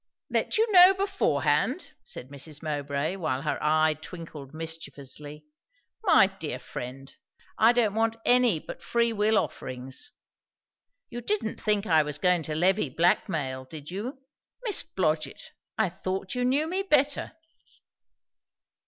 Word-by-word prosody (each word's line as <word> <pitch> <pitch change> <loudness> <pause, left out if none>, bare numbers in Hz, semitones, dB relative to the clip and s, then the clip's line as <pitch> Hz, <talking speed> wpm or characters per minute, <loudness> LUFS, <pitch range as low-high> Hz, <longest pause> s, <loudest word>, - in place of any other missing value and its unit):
"Let - - +1
you 445 - +5
know 370 0 +9
beforehand!" 390 0 0
said 125 - -8
Mrs. 145 +2 -7
Mowbray, 145 +3 -2
while 135 -7 -2
her 150 - -1
eye 155 +1 +3
twinkled 155 -6 -9
mischievously: 150 -2 -7 0.6
"My 320 - +7
dear 165 -9 -5
friend! 130 +2 -8 0.4
I 225 +2 +7
don't 235 -4 +2
want 225 +1 +1
any 245 -7 +5
but - - -9
free 235 -1 +1
will 215 +1 +2
offerings. 130 -5 -3 1.0
You 240 0 -5
didn't 240 - -2
think 210 -1 +1
I 160 -5 +5
was 150 -1 -2
going 180 +2 +3
to 155 - -2
levy 180 0 +2
black 175 +9 +2
mail? 130 -6 -2
did 150 +3 -9
you? 225 +9 -4 0.5
Miss 430 -6 +1
Blodgett! 155 -4 -2 0.3
I - - +2
thought 190 +2 -4
you 250 -1 0
knew 275 +5 +2
me 370 +3 -1
better." 295 -8 +1
175 Hz, 135 wpm, -27 LUFS, 150-235 Hz, 1.0 s, know